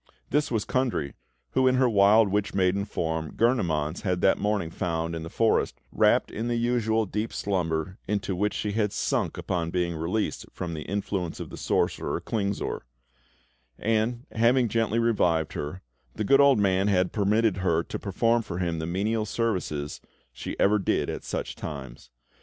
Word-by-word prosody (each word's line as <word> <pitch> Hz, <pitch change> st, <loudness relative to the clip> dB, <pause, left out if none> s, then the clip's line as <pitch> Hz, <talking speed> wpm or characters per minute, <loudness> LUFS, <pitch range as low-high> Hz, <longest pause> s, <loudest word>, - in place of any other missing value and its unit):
This 150 Hz, +1 st, +2 dB
was 110 Hz, -4 st, -1 dB
Kundry, 120 Hz, -, -1 dB, 0.4 s
who, 130 Hz, -, +3 dB
in 130 Hz, -, +4 dB
her 130 Hz, 0 st, +4 dB
wild 105 Hz, 0 st, +5 dB
witch 100 Hz, 0 st, -1 dB
maiden 95 Hz, +1 st, +2 dB
form, 80 Hz, -5 st, -3 dB
Gurnemanz 85 Hz, -, +1 dB
had 90 Hz, -3 st, 0 dB
that 95 Hz, -, +4 dB
morning 100 Hz, -5 st, 0 dB
found 85 Hz, -2 st, -2 dB
in 80 Hz, -, -4 dB
the 80 Hz, -, -6 dB
forest, 115 Hz, +5 st, +1 dB
wrapped -, -, +3 dB
in 115 Hz, +2 st, -3 dB
the 120 Hz, -, 0 dB
usual 115 Hz, -2 st, +1 dB
deep 105 Hz, +3 st, -3 dB
slumber, 90 Hz, -2 st, -2 dB
into 100 Hz, -1 st, -1 dB
which 105 Hz, +3 st, 0 dB
she 105 Hz, -, -2 dB
had 105 Hz, -1 st, 0 dB
sunk -, -, -1 dB
upon 85 Hz, -2 st, -2 dB
being 85 Hz, -1 st, -1 dB
released 85 Hz, +7 st, -2 dB
from 90 Hz, -2 st, -5 dB
the 80 Hz, -, -5 dB
influence 95 Hz, -2 st, -3 dB
of -, -, -7 dB
the -, -, -7 dB
sorcerer, -, -, 0 dB
Klingsor; 100 Hz, -3 st, -2 dB, 1.0 s
and, 115 Hz, +3 st, 0 dB
having 120 Hz, +2 st, +3 dB
gently 115 Hz, 0 st, +1 dB
revived 90 Hz, -9 st, +2 dB
her, 85 Hz, +6 st, -5 dB, 0.3 s
the 110 Hz, -, -2 dB
good 135 Hz, +6 st, +5 dB
old 140 Hz, -3 st, +6 dB
man 95 Hz, -1 st, +2 dB
had 90 Hz, -3 st, +2 dB
permitted 105 Hz, 0 st, +2 dB
her 85 Hz, -3 st, +1 dB
to -, -, -6 dB
perform 115 Hz, +4 st, +1 dB
for 90 Hz, -6 st, -6 dB
him 85 Hz, -3 st, -1 dB
the 80 Hz, -, -3 dB
menial 105 Hz, +5 st, 0 dB
services 90 Hz, -11 st, -2 dB, 0.3 s
she -, -, -6 dB
ever 105 Hz, +1 st, +4 dB
did 95 Hz, -, 0 dB
at -, -, -6 dB
such -, -, -4 dB
times. 65 Hz, -5 st, -8 dB
100 Hz, 170 wpm, -27 LUFS, 85-115 Hz, 1.0 s, old